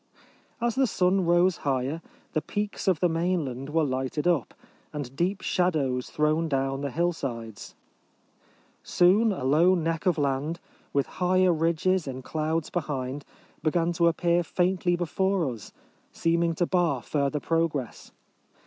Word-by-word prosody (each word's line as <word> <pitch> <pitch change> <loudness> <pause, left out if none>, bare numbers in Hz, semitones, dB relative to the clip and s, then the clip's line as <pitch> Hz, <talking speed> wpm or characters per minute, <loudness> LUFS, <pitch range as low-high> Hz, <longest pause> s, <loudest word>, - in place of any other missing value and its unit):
As 240 -1 0
the 265 +1 +2
sun 185 -2 +1
rose 175 +1 +4
higher, 140 +2 -1 0.3
the 155 - +1
peaks 205 +6 -4
of 185 -5 +3
the 180 - +4
mainland 165 -6 -1
were 160 +1 +2
lighted 130 +2 -2
up, 170 -8 +1 0.4
and 140 -3 -6
deep 180 +6 0
shadows 145 -9 0
thrown 155 +2 +1
down 135 -1 -1
the 140 - -2
hillsides. 130 -9 -3 1.1
Soon 205 +6 +4
a 185 - -4
low 160 +8 +4
neck 165 +1 -1
of 175 - +3
land, 145 +3 -1 0.3
with 140 -1 +1 0.2
higher 185 0 +4
ridges 170 +2 +1
in 130 -1 -5
clouds 160 +2 -2
behind, 140 -4 -3 0.4
began 165 +2 +1
to 170 0 +3
appear 170 +1 +2
faintly 180 0 +1
before 180 0 0
us, 110 -4 -11 0.4
seeming 165 0 +1
to 175 - +1
bar 170 -9 +1
further 145 0 -1
progress. 160 -6 -2
165 Hz, 140 wpm, -27 LUFS, 140-175 Hz, 1.1 s, rose